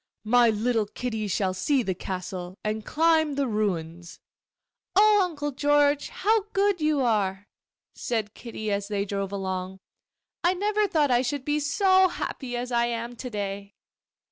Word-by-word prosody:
'My 240 +2 +4
little 220 0 0
Kitty 220 -1 -4
shall 190 -1 0
see 255 +8 +1
the 190 - -1
castle, 185 0 -6
and 215 0 -2
climb 315 +1 +2
the 280 0 +1
ruins.' 175 -7 -3 0.8
'Oh, 420 +1 +6
Uncle 295 -5 -2
George, 290 +1 +2
how 435 +1 +1
good 395 -3 +2
you 305 -2 +2
are!' 205 -4 0 0.5
said 220 -4 -3
Kitty, 220 -3 -6
as 200 0 -1
they 200 -1 -1
drove 195 -1 -3
along. 190 -1 -4 0.7
'I 350 +2 +3
never 415 +2 +1
thought 300 -7 +2
I 245 0 +4
should 260 +1 -3
be 295 0 +1
so 375 +6 +4
happy 250 -8 -5
as 245 +1 -4
I 235 0 +2
am 235 0 -4
to 250 - -6
day. 200 -2 -5
240 Hz, 155 wpm, -26 LUFS, 200-295 Hz, 0.8 s, Oh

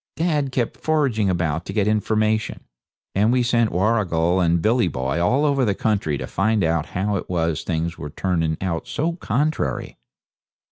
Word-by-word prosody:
Dad 150 -5 0
kept 120 -3 -1
foraging 135 -10 +1
about 85 -3 -1
to 95 - -6
get 105 -1 +1
information, 110 0 0 0.5
and 105 +4 +3
we 125 0 +2
sent 115 -2 +2
Warrigal 90 -3 +1
and 85 -1 +2
Billy 110 +2 +2
the 85 - -4
Boy 65 +6 -1
all 130 +12 +2
over 140 -2 +2
the 105 -5 +1
country 100 -10 0
to - - -5
find 110 0 +1
out 80 -1 0
how 100 +2 0
it - - -6
was 80 -3 0
things 85 0 -3
were 75 - -5
turning 80 -1 -1
out 85 -4 -2
so 160 +3 -1
contrary. 150 - -2
100 Hz, 175 wpm, -22 LUFS, 85-120 Hz, 0.5 s, and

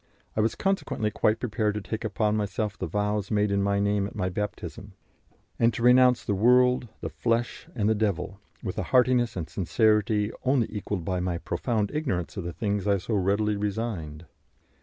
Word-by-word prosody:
I 110 - +2
was 110 - +1
consequently 190 - -1
quite 110 +2 +1
prepared 110 -3 -1
to - - -1
take 110 +5 -5
upon 105 0 0
myself 105 0 -2
the - - -4
vows 105 -1 -1
made 105 -1 +1
in 100 0 +2
my 100 0 +1
name 100 -1 +1
at - - -11
my 95 -3 -1
baptism, 95 -1 -5 0.7
and 115 0 +4
to 115 - -3
renounce 125 0 +5
the 105 - 0
world, 125 +4 +4
the - - -3
flesh, 120 0 -1
and 105 -4 +1
the 110 - +4
devil, 100 -3 -2 0.2
with - - -3
a - - -1
heartiness 125 -2 +3
and 85 -3 -4
sincerity 105 +1 +1
only 130 -2 +3
equalled 100 -4 -3
by 90 0 -1
my 90 -1 -1
profound 105 +5 -1
ignorance 130 - -2
of 95 -4 -4
the 85 - -3
things 100 +1 -2
I 100 -1 +3
so 100 +5 -4
readily 100 +2 +1
resigned. 100 -7 -3
105 Hz, 185 wpm, -27 LUFS, 100-115 Hz, 0.7 s, renounce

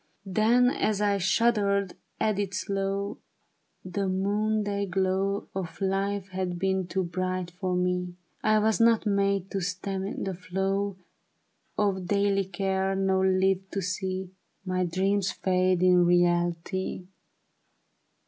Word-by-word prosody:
Then 225 +6 +3
as 215 -5 0
I 205 -1 +2
shuddered, 200 -1 +2 0.3
added 200 -3 0
slow: 195 0 -2 0.3
" - - -45
The 200 -1 0
noon 205 +3 0
day 200 0 -2
glow 190 +1 0
Of 185 -4 -5
life 195 0 -1
had 185 -2 -3
been 190 0 0
too 190 +1 -1
bright 185 0 -3
for 180 0 -2
me; 180 0 -1 0.3
I 215 0 +4
was 215 +1 +2
not 230 -1 +4
made 200 -2 +1
to 195 - -2
stem 190 +2 -3
the 190 - -2
flow 195 +2 -2 0.8
Of 190 -3 0
daily 200 0 +2
care, 190 +1 -1
nor 190 0 +2
live 190 0 +1
to 195 - -3
see 185 +1 -3 0.3
My 185 0 0
dreams 190 +3 +1
fade 185 -1 +1
in 180 -1 +5
reality. 175 +1 +1
190 Hz, 130 wpm, -27 LUFS, 185-200 Hz, 0.8 s, in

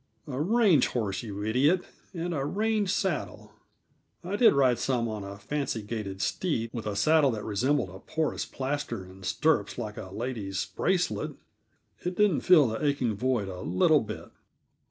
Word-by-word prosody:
"A 135 -1 -3
range 195 - +4
horse, 105 -6 -2
you 105 -3 -6
idiot, 140 - +3 0.3
and 175 -1 -3
a 140 -4 -1
range 210 +5 0
saddle. 190 -4 -2 0.7
I 185 +4 -3
did 230 +3 +6
ride 130 -3 +3
some 120 -3 0
on 110 -2 -4
a 100 0 -7
fancy 120 +1 -3
gaited 105 -3 -4
steed 115 -11 -1
with 115 -3 -4
a 105 - -2
saddle 150 +6 +4
that 110 -4 -3
resembled 120 +1 0
a 95 - -10
porus 160 +8 -2
plaster 130 -6 -3
and 95 +1 -14
stirrups 105 +2 +1
like 105 -1 -5
a 95 - -7
lady's 105 -3 -3
bracelet; - - -1 0.7
it 180 +1 -2
didn't 205 -6 +3
fill 155 -9 +6
the 110 +6 -4
aching 140 -6 +1
void 120 -1 0
a 90 -1 -6
little 115 - +3
bit." 110 -1 -7
125 Hz, 165 wpm, -28 LUFS, 105-155 Hz, 0.7 s, did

